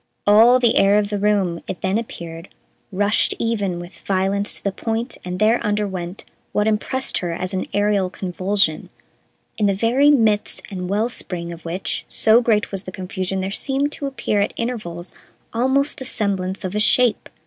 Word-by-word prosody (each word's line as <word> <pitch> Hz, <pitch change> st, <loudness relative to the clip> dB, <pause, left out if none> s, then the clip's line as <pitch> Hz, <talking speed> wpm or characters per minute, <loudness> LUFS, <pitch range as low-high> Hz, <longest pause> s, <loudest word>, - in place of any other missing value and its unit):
All 225 Hz, +5 st, +7 dB
the 240 Hz, -3 st, +3 dB
air 200 Hz, +1 st, +5 dB
of 205 Hz, -1 st, +1 dB
the 205 Hz, -1 st, -2 dB
room, 195 Hz, -5 st, +1 dB
it 190 Hz, -, -5 dB
then 195 Hz, +3 st, +1 dB
appeared, 165 Hz, -7 st, -8 dB, 0.4 s
rushed 205 Hz, +3 st, +2 dB
even 205 Hz, -6 st, -1 dB
with 175 Hz, +1 st, -10 dB
violence 195 Hz, +1 st, 0 dB
to -, -, -13 dB
the 200 Hz, -, 0 dB
point 225 Hz, +5 st, -3 dB
and 180 Hz, 0 st, -4 dB
there 220 Hz, +4 st, +3 dB
underwent 200 Hz, -4 st, -3 dB, 0.3 s
what 210 Hz, -, +2 dB
impressed 220 Hz, +5 st, -1 dB
her 175 Hz, -2 st, -3 dB
as 185 Hz, +2 st, -4 dB
an 185 Hz, -, -2 dB
aerial 205 Hz, -2 st, +1 dB
convulsion, 185 Hz, -2 st, -1 dB, 0.7 s
in 210 Hz, -, +3 dB
the 200 Hz, -, +2 dB
very 245 Hz, +8 st, +3 dB
midst 220 Hz, -7 st, +2 dB
and 180 Hz, -2 st, -4 dB
well 210 Hz, +4 st, +1 dB
spring 175 Hz, -7 st, -2 dB
of 170 Hz, -, -13 dB
which, 175 Hz, +3 st, -3 dB
so 225 Hz, +2 st, +4 dB
great 220 Hz, -3 st, +1 dB
was 195 Hz, -1 st, -3 dB
the 185 Hz, -, -6 dB
confusion, 190 Hz, 0 st, -3 dB
there 190 Hz, +1 st, -3 dB
seemed 275 Hz, +7 st, -1 dB
to 285 Hz, -, -3 dB
appear 240 Hz, -6 st, -1 dB
at 200 Hz, -, 0 dB
intervals 210 Hz, -8 st, -4 dB, 0.4 s
almost 265 Hz, +5 st, +1 dB
the -, -, -5 dB
semblance 195 Hz, -5 st, -2 dB
of 185 Hz, 0 st, -3 dB
a 210 Hz, -, 0 dB
shape. 235 Hz, +2 st, +3 dB
205 Hz, 180 wpm, -21 LUFS, 185-225 Hz, 0.7 s, All